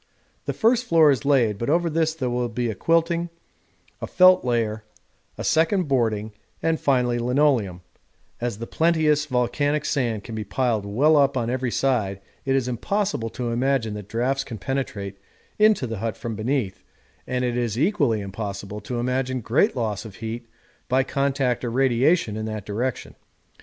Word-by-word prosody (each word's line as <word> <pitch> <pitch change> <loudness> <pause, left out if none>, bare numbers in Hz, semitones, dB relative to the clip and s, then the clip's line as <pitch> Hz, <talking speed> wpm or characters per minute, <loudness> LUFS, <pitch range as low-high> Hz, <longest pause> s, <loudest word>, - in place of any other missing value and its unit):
The - - -2
first 240 +2 +2
floor 165 -7 +5
is 130 -4 -1
laid, 120 -8 +3
but 115 - -2
over 170 +3 +2
this 160 0 0
there 130 -6 -2
will 120 0 -1
be 120 0 -2
a - - -4
quilting, 165 - +1 0.7
a - - -3
felt 185 0 +6
layer, 115 -3 -1 0.5
a - - -5
second 165 +2 +2
boarding, 110 -5 0 0.3
and 165 -1 0
finally 125 -3 +1
linoleum; 120 -7 +1 0.6
as 120 -3 -3
the 115 - -5
plenteous 155 -1 +2
volcanic 145 +3 0
sand 120 -7 -1
can 115 - -8
be 110 -1 -3
piled 110 -2 -1
well 140 +10 +3
up 140 -1 +3
on 120 -1 -1
every 130 -1 -1
side 110 -7 0 0.3
it 135 0 +2
is 130 -2 +1
impossible 130 - -1
to 120 0 -4
imagine 120 -2 0
that 105 -1 -8
draughts 130 +4 0
can 120 -4 -7
penetrate 100 -4 -4 0.4
into 215 -9 +4
the 115 -4 -5
hut 115 -1 -3
from 115 -2 -5
beneath, 110 -3 -2 0.5
and 125 0 -1
it 120 -1 -1
is 120 -3 -1
equally 145 - +2
impossible 100 0 -6
to 120 +4 -4
imagine 130 +1 -1
great 115 +3 +2
loss 110 -5 -2
of 110 -4 -10
heat 115 +2 -6 0.4
by 130 +1 +3
contact 135 -2 0
or 120 - -1
radiation 130 +1 +2
in 110 0 -3
that 110 -2 -5
direction. 115 +4 -3
125 Hz, 170 wpm, -24 LUFS, 110-145 Hz, 0.7 s, felt